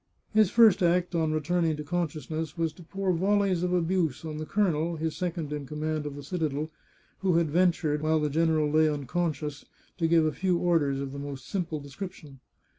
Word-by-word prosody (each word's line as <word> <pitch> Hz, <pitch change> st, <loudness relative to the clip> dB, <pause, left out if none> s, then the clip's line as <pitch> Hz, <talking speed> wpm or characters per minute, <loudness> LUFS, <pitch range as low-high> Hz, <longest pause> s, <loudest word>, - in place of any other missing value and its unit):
His 215 Hz, -3 st, +5 dB
first 225 Hz, -4 st, +6 dB
act 175 Hz, +1 st, +2 dB
on 160 Hz, -2 st, +1 dB
returning 160 Hz, +1 st, 0 dB
to 150 Hz, -, -5 dB
consciousness 155 Hz, -1 st, -3 dB
was 165 Hz, -2 st, 0 dB
to 175 Hz, -, -15 dB
pour 190 Hz, +2 st, -1 dB
volleys 195 Hz, 0 st, +2 dB
of 180 Hz, 0 st, 0 dB
abuse 170 Hz, -4 st, 0 dB
on 155 Hz, -1 st, -5 dB
the 155 Hz, 0 st, -5 dB
colonel, 170 Hz, -5 st, +1 dB
his 160 Hz, 0 st, -2 dB
second 170 Hz, -4 st, -3 dB
in 145 Hz, -2 st, -5 dB
command 150 Hz, +1 st, -2 dB
of 145 Hz, -, -6 dB
the 145 Hz, -, -8 dB
citadel, 155 Hz, -1 st, -2 dB, 0.5 s
who 185 Hz, -3 st, +1 dB
had 165 Hz, -3 st, +2 dB
ventured, 165 Hz, -3 st, +2 dB
while 155 Hz, 0 st, +2 dB
the 150 Hz, -1 st, -1 dB
gen 165 Hz, +3 st, +2 dB
eral 155 Hz, -2 st, +1 dB
lay 155 Hz, 0 st, +5 dB
unconscious, 150 Hz, 0 st, -2 dB, 0.4 s
to 165 Hz, -, +2 dB
give 165 Hz, -1 st, +4 dB
a 155 Hz, -, +2 dB
few 180 Hz, +2 st, 0 dB
orders 155 Hz, -6 st, +1 dB
of 135 Hz, -1 st, -4 dB
the 140 Hz, -, -6 dB
most 140 Hz, -2 st, -6 dB
simple 170 Hz, -5 st, -2 dB
description. 145 Hz, -1 st, -9 dB
160 Hz, 195 wpm, -28 LUFS, 150-175 Hz, 0.5 s, first